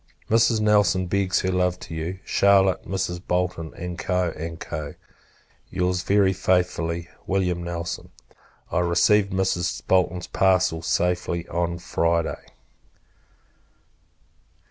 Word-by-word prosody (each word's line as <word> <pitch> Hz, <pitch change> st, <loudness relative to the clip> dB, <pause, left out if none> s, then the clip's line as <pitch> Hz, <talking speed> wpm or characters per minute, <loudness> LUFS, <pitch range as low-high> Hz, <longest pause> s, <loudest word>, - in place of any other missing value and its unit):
Mrs. 115 Hz, 0 st, +4 dB
Nelson 105 Hz, -3 st, +3 dB
begs 95 Hz, 0 st, +1 dB
her 95 Hz, -, 0 dB
love 90 Hz, -1 st, 0 dB
to -, -, -8 dB
you, 80 Hz, +4 st, -4 dB
Charlotte, 95 Hz, -1 st, +3 dB
Mrs. 90 Hz, -2 st, -2 dB
Bolton, 90 Hz, -3 st, -1 dB
&c. 85 Hz, -2 st, -3 dB
&c. 75 Hz, -1 st, -5 dB, 0.8 s
Your's, 90 Hz, 0 st, 0 dB
very 100 Hz, 0 st, +3 dB
faithfully, 90 Hz, -2 st, 0 dB, 0.2 s
Wm. 90 Hz, -2 st, 0 dB
NELSON. 85 Hz, 0 st, -5 dB, 0.6 s
I -, -, +1 dB
received 95 Hz, +4 st, +3 dB
Mrs. 95 Hz, -2 st, -1 dB
Bolton's 90 Hz, -1 st, +1 dB
parcel 95 Hz, -4 st, +2 dB
safe 90 Hz, +2 st, 0 dB
on 85 Hz, 0 st, -2 dB
Friday. 85 Hz, -1 st, -1 dB
90 Hz, 100 wpm, -24 LUFS, 85-95 Hz, 0.8 s, Mrs